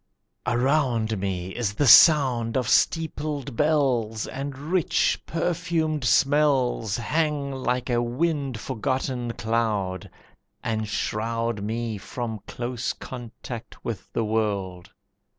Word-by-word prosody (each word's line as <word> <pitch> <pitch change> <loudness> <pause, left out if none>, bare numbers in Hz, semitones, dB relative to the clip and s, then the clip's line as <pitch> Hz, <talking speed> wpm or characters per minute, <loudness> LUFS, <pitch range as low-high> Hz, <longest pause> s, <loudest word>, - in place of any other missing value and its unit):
Around 120 -4 +1
me 95 -2 -3
is 105 -4 -1
the 145 - +1
sound 130 -4 +6
of 125 -3 0
steepled 150 -4 0
bells, 125 -7 +1
And 135 0 -5
rich 160 +4 +1
perfumed 165 -4 -1
smells 135 -4 +2
Hang 145 +3 -1
like 125 -2 -2
a 120 0 +2
wind 135 0 -1
forgotten 125 0 -2
cloud, 110 -5 -1 0.5
And 110 -2 -1
shroud 115 +1 -2
Me 110 0 -3
from 115 0 -5
close 120 0 -3
contact 120 -1 -9
with 110 -5 -5
the 115 - -1
world. 100 -5 -2
120 Hz, 105 wpm, -25 LUFS, 110-140 Hz, 0.5 s, sound